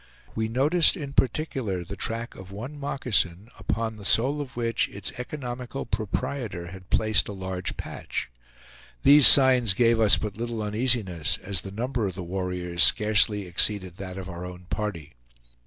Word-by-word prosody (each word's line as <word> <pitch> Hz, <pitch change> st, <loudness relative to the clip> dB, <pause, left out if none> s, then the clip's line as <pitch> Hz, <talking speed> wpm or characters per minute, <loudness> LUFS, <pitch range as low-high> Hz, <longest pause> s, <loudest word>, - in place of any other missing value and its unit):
We 110 Hz, 0 st, -2 dB
noticed 150 Hz, -, +3 dB
in 140 Hz, -4 st, -7 dB
particular 125 Hz, -, -1 dB
the 95 Hz, +4 st, -8 dB
track 115 Hz, +3 st, -3 dB
of 95 Hz, 0 st, -13 dB
one 125 Hz, +9 st, -8 dB
moccasin, 115 Hz, -7 st, -2 dB
upon 110 Hz, +1 st, -3 dB
the 105 Hz, -, -12 dB
sole 135 Hz, +8 st, +2 dB
of 135 Hz, -3 st, -9 dB
which 115 Hz, -1 st, -1 dB
its 100 Hz, -1 st, -4 dB
economical 125 Hz, -1 st, -6 dB
proprietor 105 Hz, -4 st, -4 dB
had 95 Hz, 0 st, -13 dB
placed 110 Hz, -1 st, +2 dB
a 105 Hz, -, -6 dB
large 95 Hz, -1 st, -4 dB
patch. -, -, -6 dB, 0.7 s
These 145 Hz, 0 st, +9 dB
signs 125 Hz, -6 st, +7 dB
gave 115 Hz, 0 st, +2 dB
us 105 Hz, -5 st, +5 dB
but 105 Hz, -2 st, -6 dB
little 115 Hz, -1 st, -4 dB
uneasiness, 105 Hz, -, 0 dB
as 95 Hz, -2 st, +1 dB
the 95 Hz, -, -8 dB
number 115 Hz, +2 st, -3 dB
of 95 Hz, -, -6 dB
the 95 Hz, -, -6 dB
warriors 90 Hz, -1 st, -4 dB
scarcely 105 Hz, -2 st, +3 dB
exceeded 95 Hz, 0 st, +1 dB
that 95 Hz, -1 st, -8 dB
of 95 Hz, -2 st, -7 dB
our 85 Hz, -1 st, -8 dB
own 90 Hz, 0 st, -10 dB
party. 105 Hz, -, -5 dB
105 Hz, 160 wpm, -25 LUFS, 95-125 Hz, 0.7 s, These